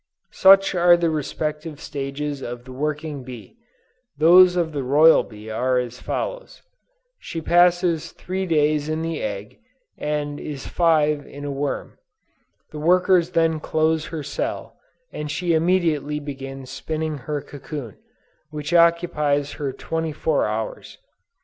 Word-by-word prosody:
"Such 195 0 +6
are 175 -1 +5
the 170 -1 +1
respective 150 0 -4
stages 140 0 -4
of 120 0 -7
the 130 - -11
working 150 +1 -3
bee: 125 - -11 0.6
those 180 +4 +7
of 170 -3 0
the 145 -2 -3
royal 150 +5 +6
bee 105 -1 -12
are 125 +3 +1
as 125 0 -3
follows: - - -5 0.6
she 165 - -6
passes 175 0 +2
three 190 +1 -4
days 150 -2 +1
in 155 +1 -2
the 165 -1 -3
egg 105 -1 -5 0.4
and 145 -1 -2
is 145 -3 -7
five 150 -4 +2
a 145 - -10
worm; 140 0 -4 0.7
the 150 - -7
workers 180 +1 +3
then 165 -2 +1
close 160 0 0
her 160 -3 -5
cell, 145 - -4 0.4
and 150 0 -5
she 170 +3 0
immediately 160 -3 +1
begins 135 -2 -8
spinning 155 +2 -4
her 150 -1 -1
cocoon, 145 -5 -8 0.5
which 150 +1 -5
occupies 160 -4 +2
her 145 -1 -4
twenty 160 +3 -3
four 155 -3 0
hours. 110 +1 -5
150 Hz, 135 wpm, -22 LUFS, 140-165 Hz, 0.7 s, those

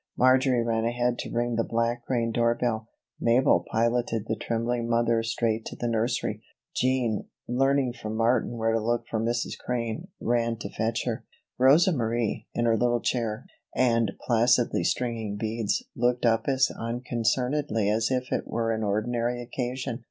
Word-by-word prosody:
Marjory 130 -1 +4
ran 115 -1 0
ahead 120 +1 0
to - - -4
ring 120 0 -1
the 115 - +2
Black 115 +1 -1
Crane 115 -3 0
door 115 0 +2
bell. 110 -2 -1 0.3
Mabel 120 +3 +3
piloted 115 -1 +1
the 110 - -1
trembling 115 +1 -2
mother 115 -1 +2
straight 115 -1 -1
to - - -6
the 120 - -3
nursery. 115 +1 -1 0.3
Jean, 125 -4 +1 0.2
learning 135 +1 +2
from 110 -3 -6
Martin 120 +1 +1
where 115 0 +1
to 115 - +2
look 120 +2 -1
for 110 - -2
Mrs. 120 +2 -1
Crane, 115 -3 -3
ran 115 -1 0
to 100 -2 -7
fetch 115 +1 -1
her. 120 -1 -2 0.4
Rosa 145 +8 +6
Marie, 115 - -1
in 120 - +1
her 115 -1 +3
little 120 +1 +2
chair 115 -2 -1 0.3
and 115 -5 +2
placidly 120 0 +2
stringing 115 -4 -1
beads, 110 0 -1
looked 120 +1 +1
up 115 -1 +2
as 130 -2 +3
unconcernedly 120 +1 -1
as 110 +2 +1
if 130 -1 -1
it - - -1
were 115 0 -1
an 110 0 -1
ordinary 115 +4 -1
occasion. 125 0 -4
115 Hz, 160 wpm, -27 LUFS, 115-125 Hz, 0.4 s, Rosa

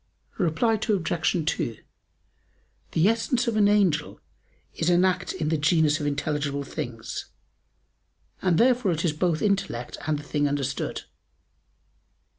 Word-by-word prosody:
Reply 180 +6 +2
Obj. 175 -6 0
2: 115 -7 -1 1.2
The 165 +4 +4
essence 235 +2 +1
of 230 - 0
an 210 -1 +4
angel 190 -7 +2 0.5
is 165 - 0
an 175 +1 +4
act 185 -1 0
in 160 -5 -2
the 160 -1 0
genus 155 0 +3
of 145 - -2
intelligible 145 -1 -1
things, 120 -4 -6 1.2
and 180 -3 +2
therefore 240 -5 +3
it 165 +2 -2
is 160 - +1
both 160 0 0
intellect 195 - -1
and 155 -1 +1
the 145 - -8
thing 145 0 0
understood. 140 -2 -2
165 Hz, 130 wpm, -25 LUFS, 145-195 Hz, 1.2 s, The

